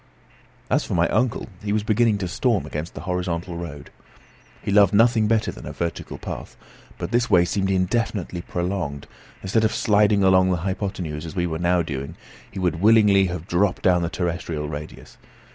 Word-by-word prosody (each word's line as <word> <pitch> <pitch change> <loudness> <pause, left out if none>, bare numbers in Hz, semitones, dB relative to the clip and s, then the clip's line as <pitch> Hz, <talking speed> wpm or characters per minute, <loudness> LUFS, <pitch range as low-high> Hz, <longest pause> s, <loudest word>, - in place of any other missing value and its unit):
As - - +1
for - - -3
my 85 0 +3
uncle, 115 +3 0 0.2
he 105 - -2
was 105 0 +1
beginning 110 0 +2
to 95 -2 -3
storm 110 +3 0
against 75 +3 -6
the - - -6
horizontal 90 -1 -3
road. 75 -4 -8 0.7
He - - -2
loved 100 -1 +5
nothing 115 0 +4
better 110 0 +1
than - - -10
a - - -5
vertical 85 -1 -4
path; - - -7 0.4
but - - -5
this 120 +1 +1
way 90 -1 +5
seemed 95 +2 -1
indefinitely 95 -1 -1
prolonged, 85 -6 -3
and - - -24
instead 110 +4 +1
of 110 - +1
sliding 105 -1 +3
along 95 0 +5
the 90 - +1
hypothenuse 95 -5 -3
as 80 - -8
we 90 -1 0
were 80 -2 -3
now 85 0 +2
doing, 70 +1 -5 0.3
he - - -11
would 90 -3 -1
willingly 105 -2 +5
have 90 -1 -5
dropped 95 +2 +1
down 90 -2 +4
the 85 - -1
terrestrial 85 -4 -3
radius. 75 0 -9
95 Hz, 185 wpm, -23 LUFS, 85-105 Hz, 0.7 s, loved